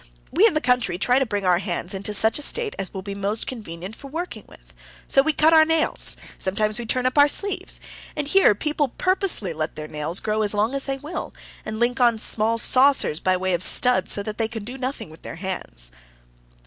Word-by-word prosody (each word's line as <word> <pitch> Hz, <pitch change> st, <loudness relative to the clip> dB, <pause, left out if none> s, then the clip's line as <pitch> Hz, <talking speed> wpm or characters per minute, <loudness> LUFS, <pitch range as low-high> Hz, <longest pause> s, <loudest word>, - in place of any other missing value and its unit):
We 380 Hz, +10 st, +5 dB
in 375 Hz, -, -1 dB
the 305 Hz, -, +1 dB
country 245 Hz, -7 st, +1 dB
try 250 Hz, +7 st, +2 dB
to 270 Hz, -, 0 dB
bring 205 Hz, -3 st, -3 dB
our 180 Hz, -1 st, +3 dB
hands 180 Hz, -1 st, -1 dB
into 200 Hz, +2 st, -3 dB
such 220 Hz, +5 st, +4 dB
a -, -, -5 dB
state 450 Hz, +8 st, 0 dB
as 190 Hz, -, -4 dB
will 190 Hz, -, -7 dB
be 200 Hz, 0 st, -6 dB
most 200 Hz, +2 st, -2 dB
convenient 195 Hz, -4 st, -8 dB
for 275 Hz, -, -11 dB
working 300 Hz, -, -6 dB
with. -, -, -19 dB, 0.3 s
So 270 Hz, -, +4 dB
we 315 Hz, +3 st, +1 dB
cut 315 Hz, +2 st, +3 dB
our 315 Hz, -1 st, +7 dB
nails; 320 Hz, 0 st, +2 dB, 0.2 s
sometimes 210 Hz, +3 st, -1 dB
we 235 Hz, -, -6 dB
turn 255 Hz, +2 st, -1 dB
up 255 Hz, +3 st, +1 dB
our 285 Hz, -, +7 dB
sleeves. 400 Hz, +7 st, 0 dB, 0.4 s
And 295 Hz, -2 st, -3 dB
here 370 Hz, -, +5 dB
people 295 Hz, +1 st, -2 dB
purposely 370 Hz, -, 0 dB
let 155 Hz, 0 st, -4 dB
their 155 Hz, 0 st, -7 dB
nails 155 Hz, +4 st, -3 dB
grow 215 Hz, 0 st, -1 dB
as 210 Hz, 0 st, -1 dB
long 215 Hz, +5 st, +1 dB
as 275 Hz, 0 st, -2 dB
they 270 Hz, -1 st, -2 dB
will, 300 Hz, +6 st, -7 dB, 0.3 s
and 215 Hz, 0 st, -6 dB
link 245 Hz, +2 st, 0 dB
on 235 Hz, -2 st, +4 dB
small 225 Hz, +1 st, 0 dB
saucers 255 Hz, -, +3 dB
by 185 Hz, 0 st, +1 dB
way 185 Hz, 0 st, -1 dB
of 175 Hz, -, -1 dB
studs, 250 Hz, +6 st, +3 dB
so 200 Hz, -, +2 dB
that 210 Hz, +1 st, -7 dB
they 225 Hz, -, +1 dB
can 225 Hz, -2 st, -7 dB
do 245 Hz, +5 st, -8 dB
nothing 260 Hz, -, -5 dB
with 160 Hz, -, -15 dB
their -, -, -8 dB
hands." 170 Hz, -, -6 dB
225 Hz, 225 wpm, -23 LUFS, 195-275 Hz, 0.4 s, our